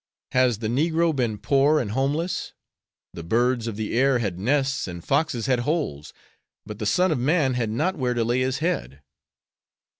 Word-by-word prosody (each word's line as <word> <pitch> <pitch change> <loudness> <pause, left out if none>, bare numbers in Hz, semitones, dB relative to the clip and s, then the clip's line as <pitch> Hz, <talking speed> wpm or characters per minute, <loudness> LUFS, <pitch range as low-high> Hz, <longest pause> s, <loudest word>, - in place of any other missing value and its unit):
Has 125 -3 +3
the 110 0 -3
negro 160 +6 +1
been 120 -5 -1
poor 140 +6 +3
and 105 -7 -3
homeless? 145 +8 -1 0.6
The 85 - -7
birds 120 +6 +1
of 115 - -4
the 110 +1 -3
air 135 +1 +3
had 100 -7 -3
nests 135 +4 0
and 85 -2 -7
the - - -23
foxes 135 -6 0
had 130 -2 +2
holes, 120 - -2 0.5
but 105 -1 -8
the 105 - -2
Son 180 - +2
of 150 - 0
man 140 0 +2
had 120 -3 -1
not 155 - 0
where 125 -2 0
to 120 - +1
lay 120 +2 +1
His 130 +1 0
head. 135 - -3
125 Hz, 185 wpm, -24 LUFS, 110-145 Hz, 0.6 s, Has